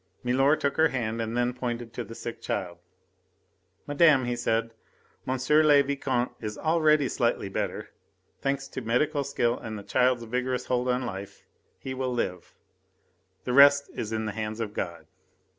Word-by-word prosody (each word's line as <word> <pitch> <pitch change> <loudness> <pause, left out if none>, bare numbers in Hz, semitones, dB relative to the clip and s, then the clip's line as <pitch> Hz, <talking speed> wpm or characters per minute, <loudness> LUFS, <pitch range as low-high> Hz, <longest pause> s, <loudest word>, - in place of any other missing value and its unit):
Milor 135 +4 +3
took 140 -2 -2
her 160 0 +5
hand 115 -5 -2
and 115 +1 -3
then 120 0 +1
pointed 120 -2 -4
to 120 - -4
the 115 - -10
sick 115 0 -7
child. 90 -3 -3 1.1
"Madame," 145 -3 +4
he 120 0 -1
said, 115 -1 -1 0.5
"M. 130 +1 0 0.3
le 145 -2 +6
Vicomte 135 -3 -1
is 105 -2 -5
already 155 -3 +3
slightly - - 0
better. - - -4 0.5
Thanks 140 0 -1
to - - -5
medical 140 +5 +1
skill 125 -3 0
and 110 -1 -6
a - - -10
child's 125 +1 +2
vigorous 125 +2 -2
hold 125 0 0
on 125 +1 0
life, 100 -3 -7 0.3
he 130 - -6
will 130 -1 -2
live. 90 -7 -3 0.9
The 125 - -2
rest 140 +1 +6
is 110 - -4
in 110 0 -2
the 105 - -2
hands 110 +1 -4
of 110 -3 -3
God." 85 -4 -5
125 Hz, 165 wpm, -27 LUFS, 115-140 Hz, 1.1 s, le